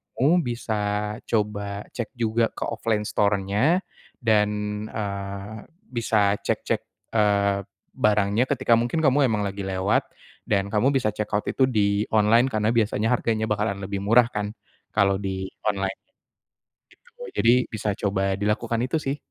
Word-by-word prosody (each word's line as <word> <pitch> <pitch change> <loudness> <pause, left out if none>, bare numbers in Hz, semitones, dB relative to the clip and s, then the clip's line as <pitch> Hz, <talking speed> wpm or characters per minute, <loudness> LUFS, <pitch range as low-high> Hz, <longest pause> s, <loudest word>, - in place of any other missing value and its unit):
kamu 165 +6 +3
bisa 120 -2 -2 0.5
coba 100 -2 -1
cek 120 -3 -4
juga 115 -1 +1
ke - - -5
offline 110 -2 -1
store-nya 105 - +1 0.4
dan, 105 -2 +4 0.4
eee, 100 0 -5 0.4
bisa 105 -3 +2
cek-cek, - - -1 0.3
eee, 100 -2 +3 0.3
barangnya 105 +3 +2
ketika 115 - +2
mungkin 120 +6 -1
kamu 135 0 +4
emang 105 -2 0
lagi 100 0 -4
lewat, 95 +1 +1 0.4
dan 100 -2 +2
kamu 110 +5 +3
bisa 110 -5 0
check 105 0 -3
out 105 - 0
itu 135 - +1
di 105 -3 +1
online. 110 +4 +5
Karena 110 -1 +1
biasanya 110 0 +1
harganya 110 -2 0
bakalan 105 -1 0
lebih 100 0 -3
murah 115 +4 +5
kan 105 0 -2 0.5
kalau 100 -2 +3
di 95 -1 -3 0.2
online, 95 -2 -1 0.9
gitu, 485 0 -26 0.2
jadi 115 - +5 0.2
bisa 110 -2 -2
coba 95 -1 0
dilakukan 105 +3 0
itu 160 - 0
sih. 135 0 -2
105 Hz, 140 wpm, -24 LUFS, 100-115 Hz, 0.9 s, online